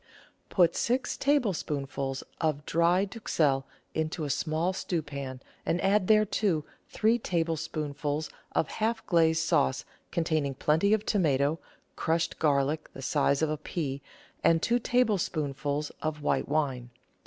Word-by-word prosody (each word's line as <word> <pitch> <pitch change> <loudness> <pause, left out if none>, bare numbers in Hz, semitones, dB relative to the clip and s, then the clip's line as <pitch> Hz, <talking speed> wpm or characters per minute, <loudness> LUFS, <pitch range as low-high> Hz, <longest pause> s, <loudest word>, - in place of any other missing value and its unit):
Put 175 -3 +4
six 250 +2 0
tablespoonfuls 145 - -1 0.2
of 150 -2 0
dry 175 +3 +3
duxelle 155 - 0 0.3
into 160 +1 -2
a 145 - -1
small 160 +5 0
stewpan, 140 -8 -4 0.2
and 175 - 0
add 195 0 +2
thereto 210 -6 +3 0.2
three 225 +2 +2
tablespoonfuls 155 -4 -2 0.2
of - - +2
half 225 +1 -2
glaze 160 -3 +3
sauce 65 - +1 0.3
con 170 - 0
taining 150 -4 0
plenty 160 +7 +3
of 215 0 -5
tomato, 150 -5 +2 0.4
crushed 165 0 0
garlic 150 0 +1
the 135 - -8
size 140 +1 +2
of 155 - +1
a 155 - -1
pea, 145 -3 -4 0.4
and 165 -1 +4
two 240 +1 +3
tablespoonfuls 150 - 0
of 155 -1 -3
white - - 0
wine. 135 -5 0
160 Hz, 130 wpm, -29 LUFS, 145-185 Hz, 0.4 s, Put